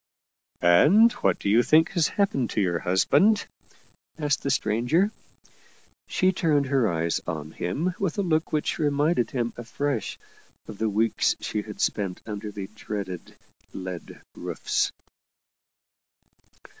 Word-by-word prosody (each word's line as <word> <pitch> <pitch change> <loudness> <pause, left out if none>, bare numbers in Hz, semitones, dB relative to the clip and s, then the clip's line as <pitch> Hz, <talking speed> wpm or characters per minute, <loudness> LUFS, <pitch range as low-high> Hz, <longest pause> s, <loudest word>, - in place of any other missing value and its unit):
" - - -68
And 150 - +6
what - - +2
do - - -5
you 110 +4 +5
think 160 +6 +4
has 170 -5 +2
happened 140 - 0
to - - -2
your 85 -3 0
hus 95 +2 +1
band? 215 +1 +4 0.4
" - - -38
asked 145 -3 0
the 140 - -2
stranger. 135 - +1 1.0
She 185 0 +2
turned 155 -6 +1
her 130 -6 +2
eyes 85 0 -1
on 80 -1 -4
him 145 - -2
with 195 -2 -1
a 200 - +1
look 160 -3 0
which 155 +2 -1
reminded 145 -2 +1
him 120 -3 -2
afresh 120 +1 -3 0.5
of 105 - -9
the 110 -1 +1
weeks 110 +2 +1
she 105 - -3
had 105 0 -10
spent 95 -4 -1
under 105 -1 -5
the 100 -1 -6
dreaded 100 -5 -6 0.2
" - - -36
lead 90 -2 -7
roofs." - - -1
120 Hz, 145 wpm, -25 LUFS, 100-155 Hz, 1.0 s, And